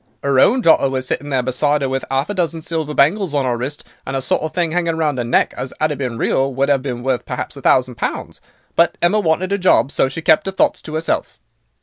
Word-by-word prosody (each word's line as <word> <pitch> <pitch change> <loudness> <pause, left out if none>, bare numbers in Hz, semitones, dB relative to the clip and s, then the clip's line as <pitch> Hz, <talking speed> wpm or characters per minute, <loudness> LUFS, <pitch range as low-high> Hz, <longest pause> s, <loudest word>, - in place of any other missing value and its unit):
"'Er 140 -2 +2
own 250 - +4
daughter 160 - +4
was 130 -1 -3
sitting 145 +3 -3
there 130 -3 0
beside 145 +3 +1
'er - - +1
with 135 0 -2
'alf 135 +2 0
a - - -3
dozen 170 -3 -1
silver 160 -1 -3
bangles 165 +2 +2
on 140 -2 +1
'er 125 -1 0
wrist, 130 +5 -5 0.2
and - - -5
a - - 0
sort - - +1
of 155 0 -3
thing 170 -3 -1
'anging 170 -2 0
around 150 -5 -1
'er - - 0
neck, 120 - +1
as, 130 - -6
'ad 155 0 +1
it 145 - -5
been 125 -4 -3
real, 135 +3 +1
would 135 +2 0
'ave 135 -2 +2
been 125 -3 -5
worth 130 -1 0
perhaps - - -5
a - - -10
thousand 130 -1 +2
pounds. - - -5 0.3
But 170 0 +2
Emma 190 +5 +2
wanted 185 0 0
a 200 - 0
job, 180 -6 +3
so 135 - +1
she 160 +5 -6
kept 155 - +3
'er - - -1
thoughts - - +1
to 155 - -7
'erself. 160 +1 -2
145 Hz, 260 wpm, -18 LUFS, 130-165 Hz, 0.3 s, own